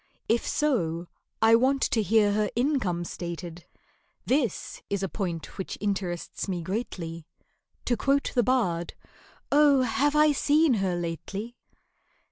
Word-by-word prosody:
If 230 +1 +1
so, 175 - 0 0.4
I 225 0 +6
want 260 +4 +3
to 225 - +2
hear 210 -1 +3
her 210 0 +1
income 240 - 0
stated 170 -1 -7 0.6
(This 255 - -1
is 200 -1 -1
a - - +1
point 175 -2 -5
which 190 - -4
interests 190 -4 -3
me 180 -3 -3
greatly). 170 -5 -5 0.6
To 245 - +2
quote 275 +4 +1
the 245 - +3
bard, 195 -9 0 0.6
"Oh! 285 -2 +5
have 285 +5 +1
I 300 0 +5
seen 295 +1 +3
her 185 -2 0
lately?" 185 +7 -5
210 Hz, 130 wpm, -27 LUFS, 175-260 Hz, 0.6 s, I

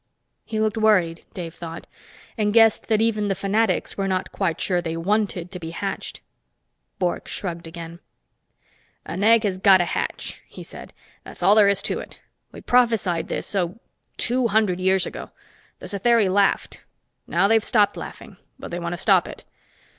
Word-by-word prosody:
He 220 -1 -3
looked 215 0 0
worried, 185 -7 +2
Dave 170 -3 -6
thought, 165 0 -8 0.5
and 210 -2 0
guessed 225 -2 +5
that 220 -1 +2
even 215 -2 0
the 195 - 0
fanatics 200 0 0
were 195 - 0
not 185 -1 -2
quite 180 -5 -1
sure 180 -2 0
they 165 -1 -4
wanted 185 -1 -1
to 180 - -7
be 165 -1 -6
hatched. 195 +4 -5 0.8
Bork 180 -2 -2
shrugged 170 -3 -5
again. 170 0 -9 1.1
"An 190 +3 -4
egg 225 +1 +5
has 190 -3 -1
got 190 -1 +7
to 175 - +1
hatch," - - -4
he - - -11
said. - - -11 0.3
"That's - - -9
all 195 +3 +6
there 210 -2 +6
is 200 0 +1
to - - -1
it. - - -10 0.3
We - - -11
prophesied 225 -9 +2
this, - - -4
oh, 185 +2 -1 0.4
two 250 0 +1
hundred 210 -4 +1
years 190 0 +2
ago. - - -7 0.5
The - - -11
Satheri 215 0 +2
laughed. 200 +1 +1 0.5
Now 175 +4 +2
they've 225 0 +3
stopped 210 -4 +2
laughing, - - -9 0.2
but - - -9
they 175 - -3
want 170 0 -3
to - - -4
stop 190 - +3
it. - - -10
195 Hz, 175 wpm, -23 LUFS, 175-215 Hz, 1.1 s, got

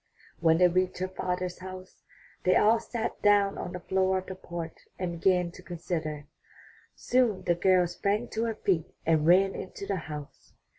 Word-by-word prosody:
When 165 -1 +4
they 180 +1 +6
reached 185 +1 0
her 185 - -1
father's 180 -1 -3
house, 185 0 -10 0.4
they 185 - +4
all 225 +2 +5
sat 230 0 -4
down 205 -1 +3
on - - -4
the 180 - -5
floor 190 +1 +1
of 185 - -4
the 190 - -6
porch 170 -3 -7 0.2
and 175 -2 -3
began 180 -1 +2
to 180 - -13
consider. 160 -4 -4 0.7
Soon 245 -6 +1
the 175 - +2
girl 180 +1 +3
sprang 200 +6 -1
to 225 +1 -1
her 225 -1 -2
feet 180 -6 -1
and 155 -1 +3
ran 190 +3 +5
into 195 +1 -7
the 195 -1 -1
house. 150 -3 -9
185 Hz, 180 wpm, -28 LUFS, 175-195 Hz, 0.7 s, they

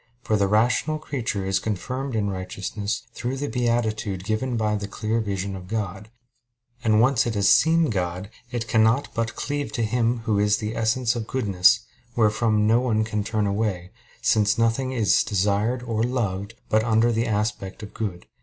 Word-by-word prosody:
For 110 - +1
the 100 -1 +2
rational 120 +9 +2
creature 115 -10 -3
is 95 0 +1
confirmed 125 +6 -3
in 105 -2 0
righteousness 100 +3 -4
through 130 +2 -3
the 145 +2 -3
beatitude 115 -6 -1
given 115 +4 -1
by 105 -1 +1
the 100 -1 -4
clear 110 +3 -2
vision 100 -2 -3
of 90 -1 -9
God; 105 -1 -4 0.7
and 110 - +3
when 110 - +5
once 125 0 +3
it 115 - -2
has 100 -1 +3
seen 160 -2 +3
God, 90 +1 -3 0.2
it 120 -2 -3
cannot 115 +4 +3
but 115 -1 -2
cleave 145 0 -3
to 115 - -1
Him 115 +1 0
Who 105 -3 +1
is 105 0 +3
the 110 0 -4
essence 115 +2 +1
of 115 -2 -4
goodness, 105 -2 +3 0.3
wherefrom 110 -1 +2
no 115 +2 +4
one 115 -4 +1
can 105 -1 -2
turn 105 0 -1
away, 100 -3 -2 0.3
since 105 -4 +3
nothing 115 +3 +1
is 115 -6 +3
desired 105 +4 0
or 115 -2 -2
loved 115 -4 -2
but 110 0 +2
under 115 +1 +3
the 115 +1 0
aspect 105 -1 -2
of 105 - -9
good. 95 -6 -4
110 Hz, 180 wpm, -24 LUFS, 100-120 Hz, 0.7 s, when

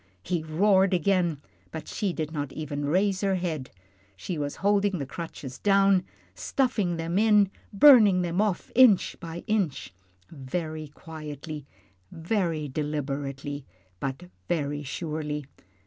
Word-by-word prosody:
He 175 -2 -1
roared 190 +4 +3
again, 175 -4 +1 0.3
but 160 - -7
she 200 -3 -1
did 155 -3 -4
not 145 -3 -3
even 145 -2 -4
raise 185 +5 +1
her 195 -1 +1
head. 165 -7 -3 0.5
She 130 - -5
was 145 -2 -3
holding 200 -1 +3
the 140 - -3
crutches 140 -3 -7
down, 195 -2 +4 0.3
stuffing 190 - 0
them 165 +3 -1
in, 210 -3 +4 0.2
burning 210 -6 +7
them 175 +3 0
off 210 -4 -1
inch 245 -6 +5
by 170 0 -7
inch 190 - -1 0.4
very 155 +2 -4
quietly, 150 -1 -8 0.4
very 165 -3 -1
deliberately, 145 -1 -3 0.4
but 135 +5 -4 0.3
very 145 -4 -1
surely. 150 0 -4
165 Hz, 125 wpm, -27 LUFS, 145-195 Hz, 0.5 s, burning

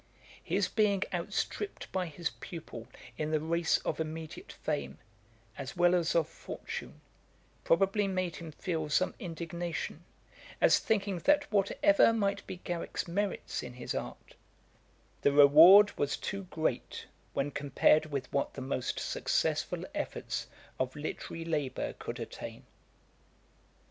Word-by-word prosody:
His - - +1
being 205 -3 +2
outstripped 415 - -3
by 185 -2 -1
his 165 +1 -3
pupil 125 -9 -8 0.3
in 155 0 -1
the 155 -1 +2
race 165 +2 +2
of - - -1
immediate 160 0 -5
fame, - - -3 0.6
as 140 +6 -6
well 175 0 +5
as 170 -2 +1
of 165 -3 +3
fortune, - - -7 0.6
probably 195 +4 +3
made 185 -3 -2
him 165 -2 -8
feel 160 -1 -3
some 185 +5 +2
indignation, 170 -1 -4 0.6
as - - +5
thinking 200 -4 0
that 295 - +3
whatever 230 +8 +4
might 200 -2 -1
be 185 - -5
Garrick's 175 0 -3
merits 200 +3 -2
in - - -8
his 125 0 -5
art, - - -6 0.9
the 140 - +4
reward 160 +9 +9
was 145 -1 0
too 195 0 -4
great 160 -2 -2 0.3
when 140 +1 -1
compared 145 +2 +3
with 140 -4 -3
what 140 - 0
the 135 - -5
most 130 -1 -2
successful - - 0
efforts - - -3 0.3
of 130 0 -1
literary 155 +2 -5
labour 150 -5 -2
could - - -6
attain. - - -7
170 Hz, 130 wpm, -31 LUFS, 150-195 Hz, 0.9 s, reward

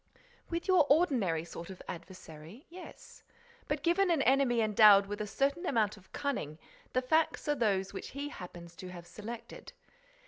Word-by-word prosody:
"With 340 0 -3
your 365 -6 +5
ordinary 245 - +2
sort 170 +1 -9
of 190 - -9
adversary, 175 - -10
yes. 360 +1 -12 0.5
But, 295 0 -2
given 350 +3 +3
an 320 -5 +2
enemy 260 -3 +3
endowed 210 -2 +6
with 205 +1 -5
a 210 - -3
certain 280 - 0
amount 215 -6 +1
of 195 -3 -20
cunning, 235 - -3 0.4
the 255 - +1
facts 315 +5 +1
are 295 - +3
those 200 -8 0
which 195 - -6
he 285 +1 -5
happens 175 - -10
to 185 - -8
have 175 -1 -9
selected. 215 +6 -9
220 Hz, 165 wpm, -31 LUFS, 185-285 Hz, 0.5 s, endowed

